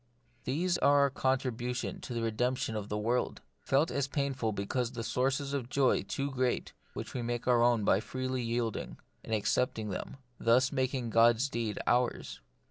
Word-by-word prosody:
These 175 +7 0
are 145 0 +5
our 140 - +4
contribution 125 -2 -1
to 125 - -6
the 115 - -1
redemption 125 +1 -1
of 105 -1 -4
the 105 - -1
world, 120 +4 0 0.2
felt 145 +5 +2
as 140 -1 0
pain 140 -1 -1
ful 115 -4 -1
because 115 +5 -2
the 115 -2 -4
sources 135 +4 0
of 135 -4 -1
a - - -15
joy 130 0 +2
too 140 +1 -3
great, 130 -1 -1 0.2
which - - -6
we 125 - -2
make 120 0 -3
our 120 -2 +4
own 120 -2 +3
by 95 - +4
freely 130 +2 -3
yielding, 115 -1 -2 0.3
and - - -9
accepting 110 +1 0
them; 95 - -5 0.2
thus 125 +3 +4
making 130 -3 -1
God's 115 +4 +4
deed 115 -4 -2
ours. 120 0 0
125 Hz, 180 wpm, -31 LUFS, 115-135 Hz, 0.3 s, are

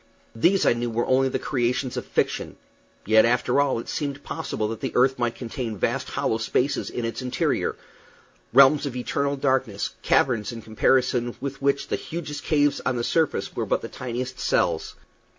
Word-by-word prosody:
These, 175 +12 +3
I - - +5
knew, 120 0 -2
were 115 +1 -1
only 130 +1 +3
the - - -1
creations 125 -1 -1
of - - -4
fiction; - - -1 0.5
yet, 110 +1 +6
after 125 +3 +2
all, 140 -4 +1
it 115 - -6
seemed 145 -1 -3
possible 110 - -3
that 115 - -5
the - - -3
earth 130 +1 +3
might 120 -1 0
contain 120 -3 -5
vast - - -1
hollow 110 - -1
spaces 125 +4 0
in 120 - -3
its 115 +3 -4
interior 125 -1 -1 0.8
realms 140 +3 +6
of 130 - -6
eternal 140 +3 -1
darkness, 130 -7 0
caverns 115 -5 +2
in 115 -2 -8
comparison 120 +2 +1
with 135 0 -5
which 140 0 0
the - - 0
hugest 150 -3 -6
caves 145 -2 +2
on 125 - 0
the 120 - -1
surface 160 +5 0
were - - -2
but - - +1
the - - -5
tiniest 125 +1 -5
cells. - - 0
125 Hz, 180 wpm, -24 LUFS, 120-140 Hz, 0.8 s, yet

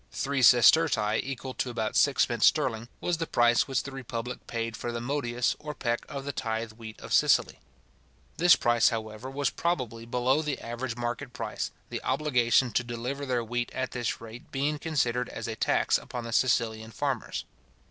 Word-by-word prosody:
Three 140 0 -1
sestertii 120 -2 +5
equal 135 -1 -5
to 130 - -2
about 115 -3 -2
sixpence - - +4
sterling, 115 +1 +1
was 175 -1 0
the 165 - -2
price 120 0 +3
which 135 -1 0
the 140 - -7
republic 125 -2 -6
paid 115 -1 -3
for 120 - -4
the 120 - -3
modius 120 -2 -1
or 150 0 -6
peck 120 -2 -2
of 140 -1 -6
the 140 - -2
tithe 115 -3 -3
wheat 110 0 -10
of - - -5
Sicily. - - +3 0.8
This 175 +1 +7
price, 120 -1 +3
however, 110 +2 -5
was 140 +1 -1
probably 125 -9 -2
below 125 +4 +2
the 150 -3 -3
average 120 0 -4
market 120 +2 -4
price, 115 -3 -3 0.2
the - - -3
obligation 125 -4 +2
to 120 - +1
deliver 125 +4 -4
their 125 -2 0
wheat 120 +1 -2
at 130 0 -2
this 120 -3 -2
rate 115 +1 -11
being 145 +2 -1
considered 125 -6 0
as - - -6
a 110 - -3
tax - - +2
upon 120 - -6
the 115 0 -5
Sicilian 110 -3 +1
farmers. 135 -1 -3
120 Hz, 180 wpm, -28 LUFS, 115-135 Hz, 0.8 s, This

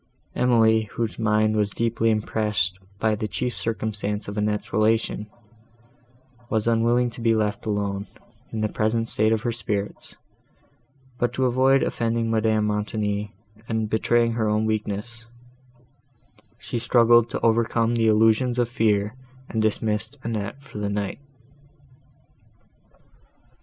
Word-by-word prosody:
—Emily, 110 -3 +3
whose 115 -2 -2
mind 110 -1 +2
was 105 -1 +1
deeply 115 +1 0
impressed 105 -4 0 0.2
by 110 +1 +1
the 105 0 -2
chief 125 +2 -3
circumstance 105 -2 -3
of 100 - -5
Annette's 105 -1 -2
relation, 110 -1 +1 1.2
was 110 -2 0
unwilling 120 +1 +2
to 115 - -9
be 115 -1 +3
left 105 -1 -1
alone, 100 -1 -2 0.4
in 110 - -3
the 110 - +2
present 115 +2 -1
state 110 +1 +2
of 110 -1 0
her 120 - 0
spirits; 105 -3 -4 1.0
but, 120 - +1
to 130 0 0
avoid 130 +2 +3
offending 115 -1 -1
Madame 110 -1 +2
Montoni, 105 0 -2 0.4
and 110 -2 -1
betraying 115 +1 +2
her 110 -2 0
own 105 +1 +1
weakness, 110 +2 -3 1.3
she 120 - -4
struggled 120 0 +4
to - - -4
overcome 115 0 +2
the 115 -1 +2
illusions 110 +3 +3
of 120 -1 +2
fear, 105 -4 +1 0.4
and 110 - -1
dismissed 110 +4 -1
Annette 115 +4 -4
for 135 -6 -9
the 100 -1 -2
night. 100 +2 -3
110 Hz, 130 wpm, -24 LUFS, 105-115 Hz, 1.3 s, struggled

